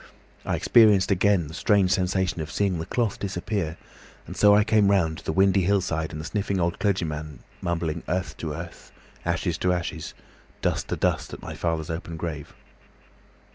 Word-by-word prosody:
I -, -, +1 dB
experienced 105 Hz, -5 st, +5 dB
again 95 Hz, -2 st, +3 dB
the 75 Hz, -, -10 dB
strange 100 Hz, 0 st, +2 dB
sensation 95 Hz, -2 st, 0 dB
of 75 Hz, -, -5 dB
seeing 95 Hz, -4 st, 0 dB
the 80 Hz, -, -5 dB
cloth 115 Hz, -5 st, -1 dB
disappear, 90 Hz, -3 st, -3 dB, 0.5 s
and -, -, -8 dB
so 105 Hz, -1 st, +6 dB
I 105 Hz, -, +5 dB
came 105 Hz, -2 st, +3 dB
round 85 Hz, -5 st, +2 dB
to -, -, -15 dB
the -, -, -2 dB
windy 95 Hz, +2 st, +4 dB
hillside 90 Hz, -4 st, 0 dB
and 75 Hz, -, -6 dB
the 75 Hz, -, -6 dB
sniffing 100 Hz, 0 st, -1 dB
old 85 Hz, 0 st, 0 dB
clergyman 80 Hz, -, -2 dB, 0.2 s
mumbling 85 Hz, -2 st, -2 dB
'Earth 90 Hz, 0 st, -2 dB
to 80 Hz, -, -4 dB
earth, 85 Hz, +3 st, -8 dB, 0.3 s
ashes -, -, -1 dB
to 90 Hz, -, +2 dB
ashes, 85 Hz, -3 st, -3 dB, 0.5 s
dust -, -, 0 dB
to -, -, -2 dB
dust,' -, -, -1 dB
at -, -, -13 dB
my -, -, -6 dB
father's 80 Hz, -1 st, -2 dB
open 80 Hz, 0 st, -5 dB
grave. 75 Hz, -3 st, -5 dB
90 Hz, 175 wpm, -25 LUFS, 80-100 Hz, 0.5 s, so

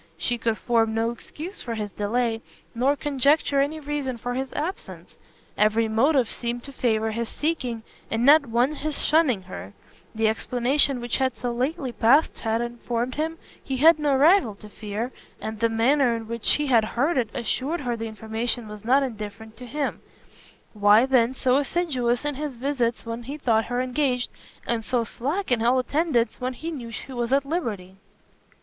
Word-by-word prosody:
She 235 Hz, +8 st, -1 dB
could 225 Hz, -1 st, 0 dB
form 225 Hz, -2 st, +1 dB
no 225 Hz, +1 st, +1 dB
excuse 320 Hz, -, -8 dB
for 235 Hz, -2 st, -4 dB
his 210 Hz, -2 st, -4 dB
delay, 225 Hz, +2 st, -1 dB, 0.3 s
nor 260 Hz, +4 st, +2 dB
conjecture 285 Hz, 0 st, +2 dB
any 300 Hz, +3 st, -1 dB
reason 285 Hz, -4 st, -3 dB
for 245 Hz, +2 st, -4 dB
his 265 Hz, +1 st, -3 dB
absence. 330 Hz, +6 st, -5 dB, 0.4 s
Every 215 Hz, +2 st, +3 dB
motive 250 Hz, +3 st, +3 dB
seemed 240 Hz, +1 st, -4 dB
to 280 Hz, -, -8 dB
favour 220 Hz, -3 st, 0 dB
his 230 Hz, +1 st, -3 dB
seeking, 255 Hz, -8 st, -2 dB, 0.3 s
and 225 Hz, +2 st, 0 dB
not 290 Hz, 0 st, +7 dB
one 240 Hz, +5 st, +2 dB
his 305 Hz, 0 st, -3 dB
shunning 290 Hz, -, +2 dB
her: 100 Hz, -, -9 dB, 0.4 s
the 220 Hz, 0 st, +2 dB
explanation 250 Hz, +4 st, +2 dB
which 240 Hz, -1 st, -1 dB
had 260 Hz, -2 st, 0 dB
so 245 Hz, 0 st, -2 dB
lately 260 Hz, +3 st, -2 dB
passed 250 Hz, +7 st, +3 dB
had 225 Hz, +1 st, 0 dB
informed 240 Hz, +1 st, -3 dB
him 320 Hz, +3 st, -2 dB, 0.3 s
he 265 Hz, -, -3 dB
had 310 Hz, +3 st, +6 dB
no 290 Hz, -2 st, +2 dB
rival 285 Hz, -, +4 dB
to 210 Hz, +1 st, -13 dB
fear, 215 Hz, +4 st, -5 dB, 0.3 s
and 220 Hz, -1 st, -5 dB
the 230 Hz, +1 st, +2 dB
manner 240 Hz, +2 st, +3 dB
in 225 Hz, -1 st, -6 dB
which 230 Hz, -1 st, +1 dB
he 295 Hz, -, +1 dB
had 240 Hz, -5 st, +4 dB
heard 265 Hz, +9 st, 0 dB
it 240 Hz, -5 st, +1 dB
assured 280 Hz, +7 st, -1 dB
her 245 Hz, -3 st, -1 dB
the 225 Hz, 0 st, -4 dB
information 220 Hz, +2 st, -3 dB
was 210 Hz, -1 st, -9 dB
not 265 Hz, +5 st, +4 dB
indifferent 220 Hz, -2 st, -6 dB
to 250 Hz, +1 st, -9 dB
him; 290 Hz, +3 st, -3 dB, 0.7 s
why, 210 Hz, +2 st, +5 dB
then, 255 Hz, -1 st, +3 dB
so 255 Hz, 0 st, +2 dB
assiduous 275 Hz, -5 st, 0 dB
in 295 Hz, -, 0 dB
his 290 Hz, -1 st, -5 dB
visits 245 Hz, -2 st, -1 dB
when 230 Hz, +1 st, -4 dB
he 275 Hz, +5 st, -6 dB
thought 225 Hz, -6 st, +2 dB
her 245 Hz, 0 st, -2 dB
engaged, 255 Hz, -1 st, 0 dB, 0.3 s
and 235 Hz, -1 st, -1 dB
so 245 Hz, +1 st, 0 dB
slack 285 Hz, -, -3 dB
in 240 Hz, -2 st, +2 dB
all 240 Hz, +3 st, +3 dB
attendance 255 Hz, -2 st, 0 dB
when 255 Hz, +1 st, -2 dB
he 320 Hz, +7 st, -6 dB
knew 250 Hz, -7 st, -6 dB
she 260 Hz, +3 st, -7 dB
was 240 Hz, -1 st, -2 dB
at 275 Hz, 0 st, +3 dB
liberty? 215 Hz, -, -3 dB
245 Hz, 180 wpm, -25 LUFS, 225-280 Hz, 0.7 s, not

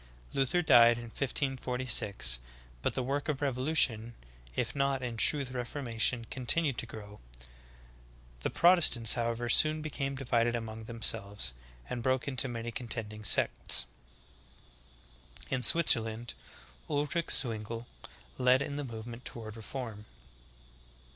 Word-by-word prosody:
Luther 140 Hz, +6 st, +1 dB
died 120 Hz, -5 st, +6 dB
in 120 Hz, -, -7 dB
1546, 125 Hz, -, 0 dB, 0.4 s
but -, -, -2 dB
the 130 Hz, -, -1 dB
work 140 Hz, +4 st, -3 dB
of 145 Hz, -3 st, -1 dB
revolution, 130 Hz, -4 st, 0 dB, 0.4 s
if 120 Hz, -, -2 dB
not 140 Hz, -1 st, 0 dB
in 120 Hz, -2 st, -4 dB
truth 130 Hz, +4 st, +3 dB
reformation, 120 Hz, -2 st, -2 dB
con 130 Hz, -2 st, -6 dB
tinued 155 Hz, -4 st, +3 dB
to 120 Hz, -, -3 dB
grow. 105 Hz, -2 st, -11 dB, 1.2 s
The -, -, -2 dB
Protestants, 170 Hz, -, +6 dB
however, 120 Hz, 0 st, -2 dB
soon 155 Hz, +5 st, +3 dB
became 140 Hz, -2 st, -4 dB
di 135 Hz, 0 st, -7 dB
vided 120 Hz, -1 st, +1 dB
among 110 Hz, -1 st, -6 dB
themselves, 100 Hz, -, 0 dB, 0.3 s
and 120 Hz, -, -5 dB
broke 130 Hz, +1 st, 0 dB
up 150 Hz, -, -4 dB
into 130 Hz, -1 st, +2 dB
many 120 Hz, -1 st, -5 dB
contending 110 Hz, -3 st, -4 dB
sects. -, -, +2 dB, 1.7 s
9. 135 Hz, -, +1 dB
In -, -, -6 dB
Switzerland, 120 Hz, -7 st, +2 dB, 0.6 s
Ulrich 150 Hz, +4 st, -1 dB
Zwingle 115 Hz, -1 st, 0 dB, 0.5 s
led 130 Hz, +1 st, +3 dB
in 140 Hz, -, -5 dB
the 145 Hz, -, -3 dB
movement 115 Hz, 0 st, -8 dB
toward 110 Hz, -2 st, -8 dB
reform. 110 Hz, -2 st, -8 dB
120 Hz, 130 wpm, -30 LUFS, 115-135 Hz, 1.7 s, died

